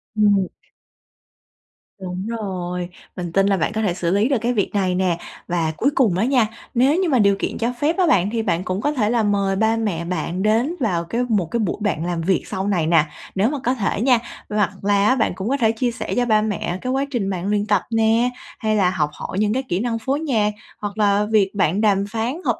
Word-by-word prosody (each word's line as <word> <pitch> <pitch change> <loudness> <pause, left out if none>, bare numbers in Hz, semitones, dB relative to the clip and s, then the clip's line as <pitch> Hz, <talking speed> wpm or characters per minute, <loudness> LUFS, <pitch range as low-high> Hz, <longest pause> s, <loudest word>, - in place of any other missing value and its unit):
Ừm. 205 -3 +3 1.5
Đúng 185 +1 -5
rồi, 180 -6 -4 0.3
mình 175 -2 -5
tin 195 +3 +3
là 200 -1 +2
bạn 165 - 0
có 220 - -1
thể 200 -5 +1
xử 170 -1 -1
lý 205 +6 +2
được 275 - +2
cái 240 +1 0
việc 205 -5 0
này 190 -3 +1
nè. 180 -2 +1 0.3
Và 170 -2 0
cuối 275 - +2
cùng 225 -10 +3
á 205 - +2
nha, 250 -4 +3 0.3
nếu 260 +5 +3
như 370 -3 +1
mà 260 -5 +3
điều 200 -2 +4
kiện - - -2
cho 235 +2 -1
phép 310 +5 +1
á 370 -2 +3
bạn, 195 - +3
thì 230 -1 -1
bạn 180 -5 0
cũng 185 +2 -2
có 290 - +1
thể 230 -8 0
là 235 -1 +2
mời 200 -2 +1
ba 220 +3 +2
mẹ 195 -7 -2
bạn 180 +1 -2
đến 230 +10 +2
vào 185 -10 0
cái 230 +9 -2
một 205 -6 +2
cái 235 - 0
buổi 205 -6 -1
bạn 180 -7 -1
làm 175 -1 -2
việc 185 +3 +1
sau 190 +1 -3
này 175 -6 +1
nè, 165 -2 +4 0.3
nếu 200 +4 +2
mà 295 - -2
có 250 - +2
thể 205 -3 -1
nha. 250 -1 +4 0.3
Hoặc 210 -2 +1
là 200 0 +3
á 255 - +4
bạn 225 -7 +1
cũng 190 +4 -3
có 275 - +1
thể 225 -5 +3
chia 240 +2 -1
sẻ 235 - -5
cho 245 - +2
ba 215 -2 +3
mẹ 200 -4 -2
cái 255 - -2
quá 270 +1 0
trình 220 -7 -1
bạn 185 -1 -3
luyện 205 0 +1
tập 205 -3 +2
nè, 225 +2 +3 0.3
hay 215 -1 0
là 195 -4 +3
học 155 -5 0
hỏi 190 - -5
những 210 0 +2
cái 265 +2 -1
kỹ 175 - 0
năng 230 +1 -1
phối 270 +5 -1
nhạc, 225 -9 +1 0.3
hoặc 205 0 -4
là 205 -1 +3
việc 200 -3 +3
bạn 195 0 +1
đàm 200 -2 +3
phán 235 +9 -2
hợp - - +1
210 Hz, 245 wpm, -21 LUFS, 185-235 Hz, 1.5 s, điều